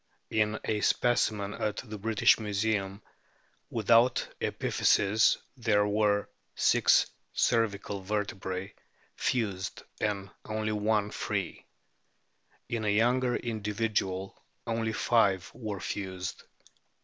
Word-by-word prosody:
J 110 - 0
In 105 0 +1
a 105 -1 0
specimen 105 -2 +1
at 105 -1 -2
the 105 -1 -7
British 110 +2 +4
Museum 105 -1 -1 0.7
without 115 +2 +3
epiphyses 105 +2 +3 0.2
there 110 -4 +2
were 105 0 +2 0.3
six - - +4 0.3
cervical 105 -3 0
vertebrae 95 -2 -3 0.4
fused 100 -7 -2 0.2
and 100 -2 -2
only 110 0 -2
one 105 0 +1
free. - - -3 1.0
In 115 -2 -2
a 105 - +1
younger 120 +4 +2
individual 105 -4 -2 0.2
only 115 -1 -1
five 105 -4 +2
were 105 -5 -5
fused. 95 -1 -5
105 Hz, 100 wpm, -29 LUFS, 100-110 Hz, 1.0 s, British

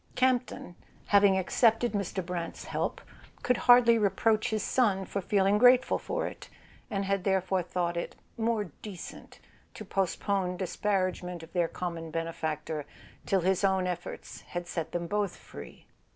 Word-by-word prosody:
Campton, 250 -7 0 0.3
having 200 -1 +5
accepted 225 +5 +2
Mr. 195 -3 -2
Brant's 175 -1 -5
help, - - -2 0.4
could 250 -1 +2
hardly 235 -1 +7
reproach 215 +1 +2
his 215 -2 -1
son 200 -7 +1
for 200 - -3
feeling 200 +2 +2
grateful 250 +2 +5
for - - -2
it, - - -8 0.4
and 200 -3 -2
had 195 -1 0
therefore 190 -1 +1
thought 175 0 -2
it 170 - -4 0.2
"more 225 -1 0 0.2
decent" 195 -5 -9 0.4
to 215 - -8
postpone 190 -1 -1
disparagement 185 -2 -2
of 165 - -13
their 175 -2 +2
common 170 -2 -5
benefactor 160 -2 -3 0.4
till 195 -2 +2
his 190 +2 +1
own 190 -1 +2
efforts 180 -1 -6
had 175 0 -6
set 165 -2 -4
them 170 0 -2
both 205 +1 -1
free. - - -12
190 Hz, 145 wpm, -29 LUFS, 175-210 Hz, 0.4 s, hardly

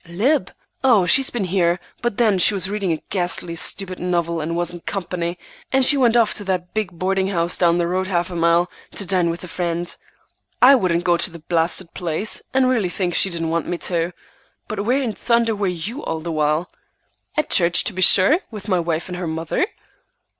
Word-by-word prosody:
"Lib? 230 - +1 0.3
Oh, 230 -8 +4
she's 265 +10 +4
been 240 -4 -3
here, 175 -1 +1 0.2
but 240 -4 -2
then 215 -5 +3
she 205 +4 +5
was 190 0 -1
reading 200 -4 -1
a 160 - -3
ghastly 175 -2 -1
stupid 185 +2 -3
novel, 170 -2 -1
and 165 +2 -3
wasn't 175 0 -3
company; 175 -2 -3 0.3
and 265 -1 +4
she 290 - +6
went 240 -4 +3
off 230 -2 +3
to 205 - -6
the 185 -2 -1
big 215 -4 -2
boarding 190 +1 0
house 170 -3 -1
down 170 -1 +3
the 175 - +1
road 185 +2 -1
half 175 -2 -1
a - - -6
mile, 170 +1 +3 0.3
to 200 - -3
dine 180 -2 +1
with 170 +2 -5
a - - -7
friend. 175 0 -3 0.6
I 255 +3 +8
wouldn't 180 -9 +1
go 175 -1 +3
to 170 - 0
the 170 - -11
blasted 170 +2 -1
place, 175 +5 -2
and 260 -1 +3
really 230 -8 +1
think 180 -1 -2
she 195 - +2
didn't 165 -2 -3
want 170 0 -1
me 175 - -2
to. 170 0 -1 0.6
But 210 -2 -3
where 260 +4 +1
in 230 -4 -2
thunder 235 -1 +1
were 200 -1 -1
you 185 - -4
all 160 - -3
the 170 +1 -4
while?" 155 +2 0 0.7
"At 305 - 0
church, 170 -1 +4
to 215 - +1
be 185 - -4
sure, 190 - +7
with 210 -2 -9
my 185 -3 +2
wife 165 -1 -2
and 180 -1 -6
her 180 - -3
mother." 165 - -1
180 Hz, 210 wpm, -21 LUFS, 170-210 Hz, 0.7 s, I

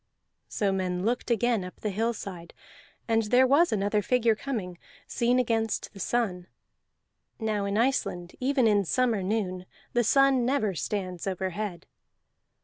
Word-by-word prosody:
So 200 -2 0
men 185 -1 -1
looked 240 +3 -1
again 235 -2 +1
up 180 - -9
the 210 - -2
hillside, 200 -5 -4 0.5
and 225 -1 +3
there 250 +4 +5
was 290 +7 +4
another 210 0 +1
figure 235 +1 +2
coming, 205 -9 -5 0.3
seen 240 +1 +1
against 225 -3 0
the 195 - -12
sun. 190 -5 -1 0.9
(Now 215 -3 -1
in 200 +1 -1
Iceland, 220 -8 0
even 260 -1 +2
in 205 -2 +4
summer 230 +2 +1
noon, 185 -2 -2 0.3
the 240 - +3
sun 275 +1 +4
never 235 -6 +1
stands 185 +1 -4
overhead.) 190 -1 -3
215 Hz, 140 wpm, -27 LUFS, 190-240 Hz, 0.9 s, there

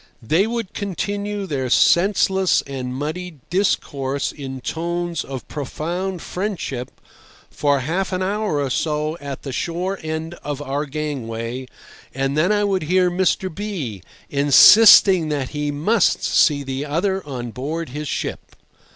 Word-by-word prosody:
They 165 - +2
would 230 -4 -4
continue 205 +1 -3
their 135 -7 -2
senseless 190 +5 +3
and 130 -2 -5
muddled 155 +2 -5
discourse 140 -7 0
in 135 -2 -7
tones 170 +2 -3
of 135 -2 -7
profound 170 +6 -4
friendship 180 - -4 0.6
for 145 -2 +1
half 180 +9 -2
an 185 0 -1
hour 200 -5 -1
or 140 -2 -1
so 150 +2 -1
at 140 -2 -7
the 135 - -5
shore 180 +7 -2
end 160 +1 -4
of 145 -1 -4
our 145 +1 -3
gangway, 130 -4 -4 0.5
and 135 +1 -1
then 165 +6 +2
I 205 0 +2
would 195 -2 +1
hear 180 +3 +2
Mr. 185 0 0
B— 165 - -5 0.3
insisting 165 +4 +7
that 140 -4 -2
he 150 0 -3
must 170 +9 +2
see 145 -2 +3
the 135 +1 -4
other 185 +6 -1
on 125 -5 -6
board 155 +7 -4
his 150 +3 -5
ship. - - -4
155 Hz, 140 wpm, -21 LUFS, 140-185 Hz, 0.6 s, insisting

